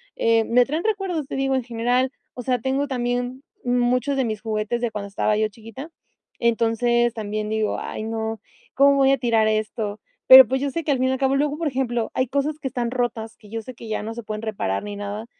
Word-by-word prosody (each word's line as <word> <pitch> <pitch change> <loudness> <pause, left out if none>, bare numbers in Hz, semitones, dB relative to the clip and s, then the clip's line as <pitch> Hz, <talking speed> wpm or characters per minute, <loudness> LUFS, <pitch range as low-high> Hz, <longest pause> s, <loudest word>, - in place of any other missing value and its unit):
eh, 230 -1 +2
me 245 +1 +4
traen 310 +5 -2
recuerdos, 385 -9 -1
te - - -5
digo, 270 0 0
en 260 - 0
general, 245 +2 0 0.2
o 250 - -7
sea, 250 0 0
tengo 270 +4 -1
también 245 +1 -2 0.2
muchos 250 +2 +1
de 260 - +1
mis 215 -2 -3
juguetes 215 +2 -2
de 240 - 0
cuando 205 -1 -5
estaba 210 +1 0
yo 215 0 +2
chiquita. 225 +9 -10 0.5
Entonces, 235 +1 +2
también 215 -1 -4
digo: 220 -1 0
"Ay 215 - -5
no, 225 -1 -3 0.4
¿cómo 280 +1 +5
voy 270 0 +4
a 275 - +3
tirar 230 -3 +2
esto?" 215 -1 -2 0.3
Pero, 260 -3 +12
pues, 265 +2 -1
yo 280 - 0
sé 330 +4 -3
que 295 - +1
al 265 - +1
fin 260 - +2
y - - +1
al 265 - 0
cabo, 270 0 +2
luego, 295 +1 0
por 330 -2 -1
ejemplo, 240 -4 -1
hay 255 -1 0
cosas 285 +3 -1
que 270 - -4
están 240 -2 -2
rotas, 235 -3 -2
que 210 - -17
yo 225 0 -4
sé 255 - -9
que 230 - -10
ya 215 - -2
no 225 +1 -5
se 235 - -6
pueden 215 +1 -5
reparar 195 - -2
ni 205 0 -6
nada, 205 +2 -5
240 Hz, 235 wpm, -23 LUFS, 220-265 Hz, 0.5 s, Pero